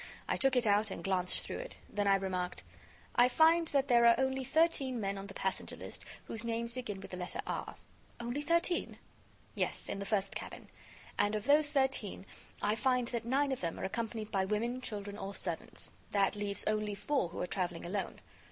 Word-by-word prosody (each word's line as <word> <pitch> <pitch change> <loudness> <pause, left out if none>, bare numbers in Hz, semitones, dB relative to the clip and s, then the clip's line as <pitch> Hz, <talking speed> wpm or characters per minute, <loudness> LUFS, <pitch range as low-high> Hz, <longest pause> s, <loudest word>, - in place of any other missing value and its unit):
I - - +1
took 270 -1 +3
it 245 -1 +3
out 210 +1 +3
and - - -6
glanced 185 -2 +2
through - - -5
it. - - -7
Then 205 0 -1
I 195 - +6
remarked: 185 -2 -2 0.5
"I 245 +1 +6
find 325 +5 +5
that 280 -2 +1
there 235 -2 +6
are 235 - +7
only 265 0 0
thirteen 275 -4 +2
men 200 -2 -1
on 195 0 -6
the 195 - -10
passenger 190 0 -2
list - - -9 0.2
whose 225 0 -3
names 235 0 +1
begin 215 -6 -5
with - - -10
the 180 - -5
letter 180 - -4
R." - - -4 0.4
"Only 240 +4 -2
thirteen?" 335 +2 +1 0.6
"Yes, - - -1
in - - -3
the 200 - -4
first 200 -2 0
cabin. - - -7 0.5
And 205 +1 +3
of 210 - -3
those 295 +1 +5
thirteen, 265 -9 0 0.4
I 210 - +3
find 250 +1 +2
that 235 -2 -3
nine 275 +3 +2
of 265 - -2
them 170 -2 -3
are - - -5
accompanied 220 +1 -3
by 190 -1 +2
women, 230 +6 -1
children 205 -3 -5
or 195 +1 -5
servants. 170 -4 -3 0.2
That 200 0 +2
leaves 205 -1 -1
only 215 -1 0
four 260 - 0
who - - -7
are - - 0
traveling 175 -2 -2
alone. 195 +3 -3
220 Hz, 200 wpm, -33 LUFS, 195-260 Hz, 0.6 s, are